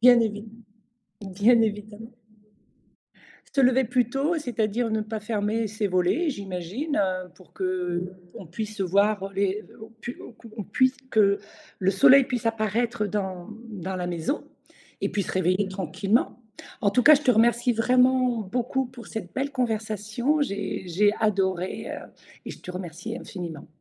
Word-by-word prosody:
bien 245 -1 +8
évide 215 0 -2 0.7
bien 205 +5 +4
évidement. 215 +1 -3 1.4
Se 275 - +3
lever 255 +1 +4
plus 245 0 +1
tôt, 285 +6 0
c'est-à-dire 230 -3 -1
ne 220 - 0
pas 215 +1 -4
fermer 215 +1 -1
ses 215 0 -2
volets, 185 - +1
j'imagine, 200 - -4
heu, 185 -2 0
pour 185 - -19
qu'on 180 -1 -4
puisse, 210 +4 -6
heu, 190 - +2
voir, 200 +2 +2
heu, 195 - -6
les 200 +1 0 0.2
on 220 - -9
pu 230 +2 -8
on - - -12
c 230 - -15
on 210 - -3
puisse 260 +6 +2
que 200 -2 +4 0.4
le 190 0 +2
soleil 260 +8 +7
puisse 245 -2 -3
apparaître, 225 +1 0
heu, - - -2
dans 190 -2 -3 0.2
dans 190 -2 -5
la 180 -1 -3
maison 175 - -2 0.6
et - - 0
puis 205 - -1
se - - -5
réveiller 185 +2 +1
tranquillement. 195 +6 0 0.4
En 200 - +4
tout 250 +3 +3
cas, 305 +1 +9
je 290 - 0
te 260 - +4
remercie 235 +2 +3
vraiment 250 +1 +3
beaucoup 245 +5 -1
pour 245 -2 -12
cette 205 -6 -6
belle 280 +2 -2
conversation. 225 +3 0
J'ai 200 -5 -3
j'ai 205 +4 +3
adoré, 190 -4 0
heu - - -7 0.4
et - - -6
je - - -9
te - - -8
remercie 180 +5 -6
infiniment. 175 - -7
215 Hz, 165 wpm, -26 LUFS, 190-240 Hz, 1.4 s, cas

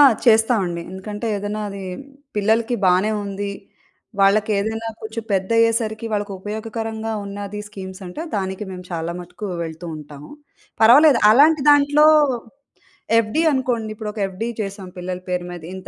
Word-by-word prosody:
ఆ! - - +10 0.2
చేస్తామండి. 220 -7 +3
ఎందుకంటే, 205 +4 -6
ఏదైనా 205 +1 -4
అది 200 -1 -7 0.5
పిల్లలకి 225 +4 +2
బానే 185 +4 +3
ఉంది. 200 0 -4 0.7
వాళ్ళకేదైనా 215 +2 +2
కొంచెం 220 +1 -5
పెద్దయ్యేసరికి 225 +3 +1
వాళ్ళకుపయోగకరంగా 220 +2 -4
ఉన్నది 200 +1 -6
స్కీమ్స్ 190 -1 -9
అంటే, 180 - -6
దానికి 190 +1 -3
మేము 180 -1 -8
చాలా 165 0 -3
మటుకు 180 +4 -8 0.2
వెళ్తూ 165 +1 -7
ఉంటాము. 150 -1 -11 0.5
పర్వాలేదు 270 +5 +7
అలాంటి 295 +5 +5
దాంట్లో 290 +1 +5 1.1
ఎఫ్‌డి 230 +8 +1
అనుకోండి, 245 -5 -1
ఇప్పుడు 210 -1 -5
ఒక 210 - -8
ఎఫ్‌డి 190 +5 -5
చేసాం 195 -2 -5
పిల్లల 180 0 -4
పేరు 180 -1 -1
మీద 175 -2 -8
ఇంత 190 - -9
210 Hz, 130 wpm, -21 LUFS, 190-225 Hz, 1.1 s, ఆ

